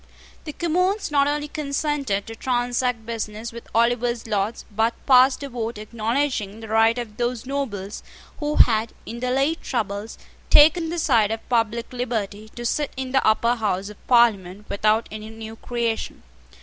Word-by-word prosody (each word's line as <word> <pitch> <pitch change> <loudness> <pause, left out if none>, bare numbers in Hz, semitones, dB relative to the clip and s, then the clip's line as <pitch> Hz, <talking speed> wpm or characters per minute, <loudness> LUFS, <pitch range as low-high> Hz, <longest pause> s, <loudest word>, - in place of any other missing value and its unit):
The 300 - -5
Commons 365 +4 0
not 280 -1 +3
only 295 0 -1
consented 280 -8 -2
to 225 - -8
transact 245 -1 -1
business 225 0 -5
with 235 0 -10
Oliver's 235 0 +1
Lords, 210 0 -2
but 225 +3 +1
passed 260 +1 +5
a 280 - -5
vote 235 -2 -4
acknowledging 220 0 -2
the 225 -1 -9
right 225 +1 +4
of 225 -3 -6
those 240 0 -2
nobles 225 -8 -4 0.4
who 300 0 -1
had, 220 -1 +4
in 235 +2 -6
the 250 +1 -1
late 275 +6 +1
troubles, 215 -3 -3 0.3
taken 320 +2 +6
the 345 - -3
side 230 -10 +3
of 225 0 -5
public 235 0 0
liberty, 220 -4 -3
to 240 - -6
sit 290 +4 0
in 260 -1 -4
the 265 0 +3
Upper 230 +2 +3
House 200 -3 -1
of 210 - -15
Parliament 210 -5 +3
without 215 +2 +2
any 215 0 -7
new 225 0 -8
creation. 235 -1 -3
235 Hz, 160 wpm, -23 LUFS, 220-265 Hz, 0.4 s, taken